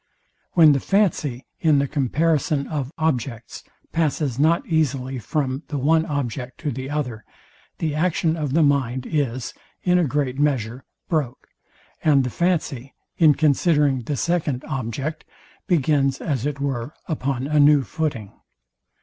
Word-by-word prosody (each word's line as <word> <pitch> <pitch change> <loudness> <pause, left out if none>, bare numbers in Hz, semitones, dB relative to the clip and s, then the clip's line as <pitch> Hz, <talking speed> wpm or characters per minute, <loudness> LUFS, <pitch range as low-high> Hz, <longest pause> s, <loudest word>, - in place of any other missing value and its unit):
When 160 -4 +7
the 140 - +2
fancy, 155 - 0
in 155 -3 +4
the 140 0 +1
comparison 150 +1 +1
of 140 -3 -4
objects, 125 -7 -2 0.3
passes 150 -5 0
not 160 +3 +3
easily 135 -5 0
from 135 +3 -2
the 145 - -3
one 160 +4 +2
object 130 -3 -3
to 150 -3 -1
the 130 +2 -5
other, 125 -7 -3 0.5
the 155 -3 -1
action 160 0 +1
of 150 -5 -3
the 165 +1 +4
mind 130 -3 +1
is, 130 -6 -2 0.3
in 180 0 +3
a - - +3
great 140 -1 -1
measure, 130 -4 0 0.2
broke, 145 -7 -2 0.5
and 140 -3 +4
the 125 - -3
fancy, 150 -7 -1 0.2
in 155 -4 +6
considering 145 -3 +2
the 140 +4 -3
second 155 -6 -1
object, 135 +5 -4 0.4
begins, 140 -5 +2
as 140 -3 -1
it 145 -1 -4
were, 135 -2 -3
upon 135 -5 -2
a 150 +1 +1
new 145 -1 +6
footing. 120 - -3
145 Hz, 140 wpm, -22 LUFS, 130-155 Hz, 0.5 s, When